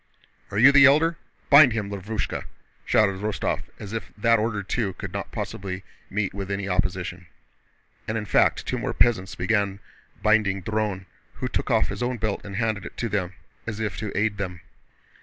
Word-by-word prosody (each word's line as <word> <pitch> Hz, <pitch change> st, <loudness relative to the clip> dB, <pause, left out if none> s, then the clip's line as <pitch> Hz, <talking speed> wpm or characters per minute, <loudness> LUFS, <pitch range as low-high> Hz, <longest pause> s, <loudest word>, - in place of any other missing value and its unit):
"Are 100 Hz, -, -4 dB
you 130 Hz, +6 st, +8 dB
the 140 Hz, 0 st, +8 dB
Elder? 160 Hz, +4 st, +4 dB, 0.3 s
Bind 140 Hz, -4 st, +9 dB
him, 105 Hz, -3 st, -3 dB
Lavrúshka!" 100 Hz, +1 st, -3 dB, 0.4 s
shouted 100 Hz, -3 st, +3 dB
Rostóv, 105 Hz, -1 st, -1 dB, 0.2 s
as 105 Hz, 0 st, -8 dB
if 105 Hz, -5 st, -5 dB
that 115 Hz, +1 st, +4 dB
order, 105 Hz, -2 st, -1 dB
too, 100 Hz, 0 st, -1 dB
could -, -, -7 dB
not -, -, -4 dB
possibly 95 Hz, -1 st, -5 dB, 0.3 s
meet 100 Hz, -1 st, -1 dB
with 100 Hz, 0 st, -5 dB
any 100 Hz, 0 st, -2 dB
opposition. 90 Hz, -1 st, -2 dB, 0.8 s
And 110 Hz, -, -1 dB
in 110 Hz, -, -3 dB
fact -, -, +3 dB
two -, -, -2 dB
more -, -, -3 dB
peasants 95 Hz, -6 st, +2 dB
began 100 Hz, +1 st, 0 dB, 0.4 s
binding 105 Hz, -3 st, +3 dB
Dron, 105 Hz, -2 st, -2 dB, 0.3 s
who -, -, -3 dB
took -, -, -2 dB
off -, -, +3 dB
his -, -, -5 dB
own 125 Hz, 0 st, -1 dB
belt 110 Hz, -2 st, -2 dB
and 100 Hz, -1 st, -7 dB
handed 110 Hz, -2 st, -1 dB
it -, -, -9 dB
to 115 Hz, -, -2 dB
them, 95 Hz, -3 st, -1 dB, 0.3 s
as 110 Hz, -2 st, -4 dB
if 105 Hz, -4 st, -2 dB
to 105 Hz, -2 st, -4 dB
aid 105 Hz, 0 st, +1 dB
them. 90 Hz, -3 st, -4 dB
105 Hz, 180 wpm, -25 LUFS, 95-110 Hz, 0.8 s, Bind